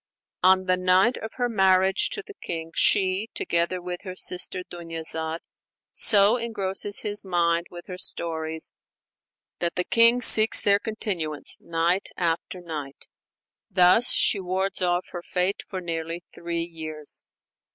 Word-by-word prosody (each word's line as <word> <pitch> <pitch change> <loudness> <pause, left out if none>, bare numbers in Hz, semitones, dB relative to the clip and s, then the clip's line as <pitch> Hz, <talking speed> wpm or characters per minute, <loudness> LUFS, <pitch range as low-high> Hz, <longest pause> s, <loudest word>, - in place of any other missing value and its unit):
On 185 +1 +4
the 185 0 +1
night 185 +6 +3
of 220 - -8
her 245 -1 -1
marriage 190 -3 +2
to 425 - -6
the 415 - -11
king, 165 - -7
she, 195 +2 +1
together 170 +2 -1
with 180 0 -7
her 185 -2 -8
sister 180 0 0
Dunyazad, 165 -1 -6 0.5
so 205 +2 +4
engrosses 205 -3 -1
his 205 0 -1
mind 170 -2 0
with 175 0 -11
her 185 -2 -9
stories 160 -2 -3 0.9
that 170 -1 -2
the 180 - 0
king 230 +4 +4
seeks 220 -2 +9
their 200 0 +4
continuance 175 -10 -4
night 170 +3 -1
after 170 +1 -3
night; 150 -5 -7 0.6
thus 190 +5 +4
she 205 - +2
wards 190 +1 -3
off 175 0 0
her 175 - -6
fate 180 +2 -2
for 190 - -5
nearly 165 0 -5
three 170 -1 -4
years. 155 -3 -6
180 Hz, 140 wpm, -24 LUFS, 170-195 Hz, 0.9 s, seeks